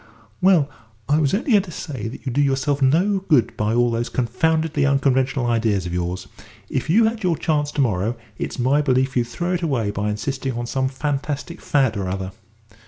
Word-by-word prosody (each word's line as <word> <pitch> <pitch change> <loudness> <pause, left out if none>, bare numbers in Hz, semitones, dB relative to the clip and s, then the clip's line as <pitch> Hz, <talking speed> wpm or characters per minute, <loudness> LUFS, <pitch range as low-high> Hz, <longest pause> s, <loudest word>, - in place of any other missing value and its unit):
"Well, 180 -6 +5 0.4
I 145 +2 +3
was 145 -3 +2
only 240 +5 -1
going 205 -3 +6
to 190 - -11
say 140 - -5
that 115 - -9
you 130 - -1
do 140 +4 +1
yourself 140 +1 +1
no 175 +9 +3
good 150 - +2
by 105 +2 0
all 120 0 +3
those 115 +1 -1
confoundedly 155 +5 0
unconventional 135 -2 +2
ideas 110 -5 +1
of 85 - -4
yours. 90 +1 -3 0.4
If 130 +3 -2
you 215 +8 +5
had 225 0 -1
your 175 -5 +1
chance 150 -1 0
to 145 - +1
morrow, 110 -1 0 0.2
it's - - -4
my 135 +4 +2
belief 130 -2 +1
you'd 120 -2 +2
throw 175 +8 -2
it 180 - -1
away 125 -11 0
by 105 +1 -2
insisting 130 +5 -3
on 120 +1 -3
some 130 +2 0
fantastic 145 +4 -3
fad 135 -6 +1
or 95 -2 -2
other." 95 0 -3
135 Hz, 200 wpm, -22 LUFS, 115-155 Hz, 0.4 s, going